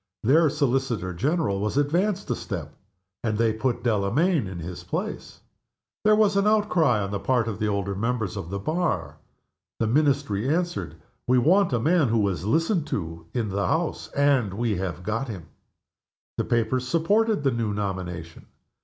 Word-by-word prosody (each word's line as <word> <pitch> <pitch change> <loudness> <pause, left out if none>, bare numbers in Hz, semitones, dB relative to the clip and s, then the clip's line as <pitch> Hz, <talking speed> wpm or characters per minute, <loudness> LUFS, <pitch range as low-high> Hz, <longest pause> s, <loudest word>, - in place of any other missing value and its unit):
Their 155 +7 +5
Solicitor 130 - 0
General 135 - 0
was 105 +6 -2
advanced 180 +8 +1
a - - +1
step, 80 -7 -6 0.5
and 110 -3 0
they 115 -1 +2
put 120 +2 -1
Delamayn 120 - +1
in 95 -1 -6
his 85 +1 -7
place. - - -5 0.6
There 215 0 +5
was 210 -2 +3
an 200 +1 +3
outcry 180 - +3
on 100 -1 -3
the 100 - -2
part 120 +1 +1
of 110 -4 -4
the 110 - 0
older 100 -1 -1
members 110 0 -2
of 85 - -5
the 100 - -3
Bar. 160 - -2 0.6
The - - +1
Ministry 135 -3 +1
answered, 175 +3 -1 0.3
"We 125 +1 +4
want 180 +8 +4
a 120 - +1
man 160 +4 +3
who 110 -3 +2
is 90 -1 -4
listened 165 - +1
to 80 - -4
in 115 -4 0
the 100 -1 -1
House, 160 - -1
and 140 -9 +2
we 110 -2 0
have 90 -1 -4
got 115 +7 -2
him." 95 -9 -8 0.9
The - - 0
papers 120 +2 0
supported 200 - +2
the 135 - +3
new 115 -3 -1
nomination. 90 -5 -5
120 Hz, 170 wpm, -25 LUFS, 100-155 Hz, 0.9 s, Their